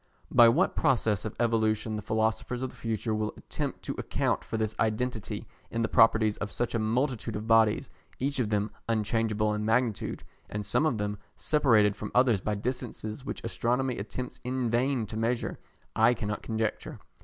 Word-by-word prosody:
By 120 -1 +8
what 160 +11 +2
process 115 -8 +2
of 110 - -4
evolution 110 -2 +1
the 105 - -3
philosophers 110 +3 -1
of 130 - -3
the - - -17
future 115 0 -2
will 110 0 -2
attempt - - -5
to - - -3
account - - 0
for 115 - -4
this 110 -1 -1
identity 115 0 -1 0.2
in 115 0 -1
the - - +2
properties 110 -2 +4
of 105 - -4
such 120 +3 -2
a 115 - +1
multitude 115 0 0
of 105 +1 -4
bodies, 110 -1 +4 0.3
each 140 +1 -1
of 115 -4 +1
them 105 0 0 0.2
unchangeable 110 -1 +1
in 105 0 -2
magnitude, 115 0 0 0.3
and 105 0 -4
some 150 +10 +2
of 125 - 0
them 105 -1 -2 0.2
separated 115 -9 +3
from 105 - -6
others 125 -6 +4
by 105 +1 -1
distances 120 +1 -4
which - - -5
Astronomy 120 +4 0
attempts 120 +5 -6
in 125 -2 -1
vain 125 0 +1
to 105 - -8
measure, 115 +2 -1 0.4
I 125 - +5
cannot 105 -1 -3
conjecture. 110 -1 -3
110 Hz, 180 wpm, -29 LUFS, 105-125 Hz, 0.4 s, By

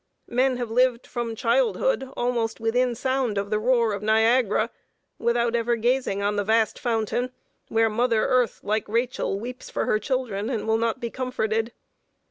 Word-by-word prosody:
Men 255 +1 +2
have 240 -2 -4
lived 250 0 +2
from 235 -2 -4
childhood - - +1
almost 240 -2 -1
within 240 +2 +1
sound 260 -3 -1
of 200 +1 -2
the 215 - +2
roar 235 -1 +2
of 200 - -4
Niagara, 220 +1 +3 0.5
without 235 0 +1
ever 235 0 +1
gazing 235 -3 0
on 205 +1 0
the 205 - +1
vast 220 +1 +1
fountain, 240 +1 -1 0.4
where 225 0 +2
mother 230 0 +1
Earth, 250 -3 +1
like 215 +1 -1
Rachel, 235 -3 -1
weeps 250 +3 -7
for - - -2
her 215 - +2
children, 235 -5 -2
and 225 -4 -3
will 220 0 +2
not 230 +2 0
be 235 -2 -4
comforted. 225 -3 -1
235 Hz, 165 wpm, -25 LUFS, 220-250 Hz, 0.5 s, Niagara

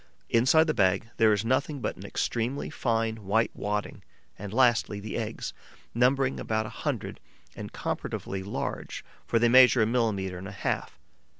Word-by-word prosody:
Inside 130 +8 +5
the 155 - 0
bag 100 +2 +1
there 110 -1 +5
is 105 +1 +1
nothing 135 +4 0
but - - -3
an - - -11
extremely 120 +4 -2
fine, 115 -2 0
white 110 +2 +1
wadding 105 0 -3 0.3
and, 100 0 -8
lastly, 120 -4 +2
the 105 +1 -6
eggs, 115 -1 -4 0.4
numbering 130 +2 +2
about 110 0 -1
a - - -6
hundred - - -4 0.4
and - - -7
comparatively 95 -1 -4
large, 100 +2 -5 0.2
for 115 - +2
they 120 +1 +4
measure 125 -1 +7
a - - +3
millimetre 105 -6 -1
and 95 - -7
a - - -7
half. 95 - -3
115 Hz, 165 wpm, -28 LUFS, 105-125 Hz, 0.4 s, measure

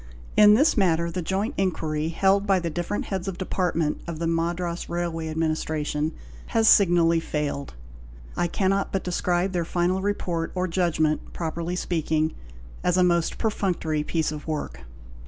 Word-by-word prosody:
In 210 0 +8
this 290 +7 +4
matter 170 -5 +2
the 180 +2 -3
joint 195 - -1
inquiry 160 -5 -1
held 195 +4 +2
by 195 -1 +4
the 170 -2 -2
different 175 +5 -3
heads 190 -1 -3
of 190 -2 -3
department 175 -4 -1
of 170 -2 -4
the 165 - -2
Madras 170 +1 -1
Railway 170 -2 -2
Administration 155 -1 -1 0.4
has 225 -1 +2
signally 170 -5 +5
failed. 150 - -3 0.6
I 175 - +1
cannot 195 +2 0
but 195 - -1
describe 180 +1 0
their 175 -2 0
final 175 +3 0
report 180 -5 -2
or 185 0 0
judgment 165 -3 0
(properly 170 +1 -3
speaking) 160 -3 0 0.5
as 180 0 +2
a 180 - +5
most 170 -2 +1
perfunctory 180 -8 -1
piece 160 -1 -1
of 150 0 -7
work. 70 - -4
170 Hz, 155 wpm, -25 LUFS, 160-185 Hz, 0.6 s, In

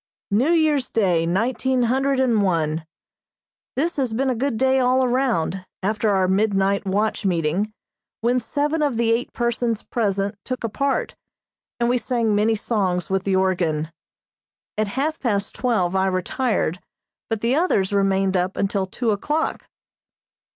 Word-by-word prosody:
New 235 +9 +3
Year's 310 -5 +2
Day, 180 -7 +1
nineteen 250 +7 +1
hundred 265 +3 +1
and 240 -5 +3
one. 160 -4 0 0.9
This 325 +5 -1
has 255 -5 0
been 260 +3 +1
a - - -1
good 255 0 -1
day 265 +2 +3
all 255 +1 +3
around, 240 -8 0 0.2
after 215 +2 +1
our 190 -2 +2
midnight 195 0 +1
watch 210 +3 0
meeting, 180 +3 0 0.5
when 245 +2 +2
seven 290 +6 -1
of 285 -6 +1
the 230 -1 +2
eight 235 +2 0
persons 235 -2 -1
present 200 -3 -1
took 255 -1 -4
a 230 - -1
part, 275 +5 -1 0.6
and 235 - +2
we 245 +1 +2
sang 235 -4 0
many 215 +2 +2
songs 190 -6 -1
with 190 0 0
the 195 -1 +1
organ. 170 -5 0 0.8
At 215 0 0
half 310 +3 0
past 205 -5 -1
twelve 200 -8 0
I 190 0 +2
retired, 185 -1 -1 0.5
but 225 -2 -2
the 235 +2 +1
others 265 - +1
remained 195 -1 +2
up 180 +1 0
until 195 -1 0
two 225 +4 -1
o'clock. 295 +10 -2
220 Hz, 150 wpm, -22 LUFS, 190-255 Hz, 0.9 s, New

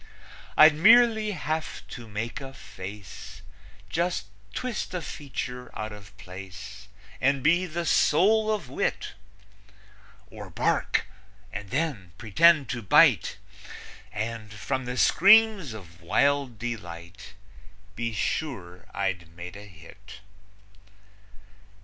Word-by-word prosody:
I'd 155 0 +9
merely 220 +5 +5
have 160 -3 -4
to 120 -2 -9
make 110 +5 -5
a 135 -1 -9
face, 95 -1 -10 0.4
Just 170 - -1 0.3
twist 235 - -4
a 180 - -2
feature 125 -3 -6
out 110 0 -4
of 100 -1 -13
place, 100 +2 -10 0.3
And 135 0 +2
be 175 +4 +3
the 170 +1 -4
soul 215 +9 +3
of 205 -10 -2
wit; 130 - -2 1.2
Or - - -9
bark, - - 0 0.5
and 100 0 -6
then 130 - -2
pretend 140 - +4
to 120 - -3
bite, 100 - +4 0.7
And, 110 0 -5
from 125 +5 -3
the 125 +1 -4
screams 200 - +5
of 90 -6 -11
wild 140 +6 +1
delight, 100 -4 -7 0.6
Be 115 0 -2
sure 100 - -4
I'd 90 -4 -2
made 90 +2 -8
a 100 +1 -10
hit. 100 +4 -14
115 Hz, 110 wpm, -26 LUFS, 100-155 Hz, 1.2 s, I'd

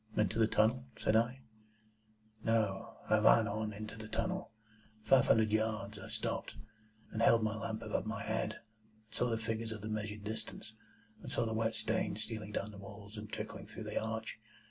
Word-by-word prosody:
"Into 105 +1 +2
the 110 - +6
tunnel?" 115 +4 +3
said 110 - +2
I. 120 +4 +3 1.0
"No. 110 -4 +1
I - - +5
ran - - +6
on 105 +1 -1
into 105 +1 -6
the 110 0 -7
tunnel, 185 - -2 0.5
five 135 +1 +6
hundred 110 -1 +5
yards. 110 -1 0
I - - -8
stopped, - - -2 0.6
and 110 - -2
held 115 -1 +6
my 110 0 +1
lamp 110 0 -3
above 110 0 -1
my 110 -2 -2
head, 110 0 0
and - - -13 0.5
saw 125 - +1
the 115 - +1
figures 110 0 -2
of 110 -2 -5
the 110 - -4
measured 105 -1 -3
distance, 110 +1 -6 0.5
and - - -7
saw - - +2
the 110 - -1
wet 110 0 +1
stains 110 -1 0
stealing 110 -1 -5
down 105 0 -2
the 100 - -10
walls 100 +1 -10
and 105 -1 -7
trickling - - -5
through - - -6
the - - -1
arch. 110 0 -3
110 Hz, 190 wpm, -35 LUFS, 105-110 Hz, 1.0 s, the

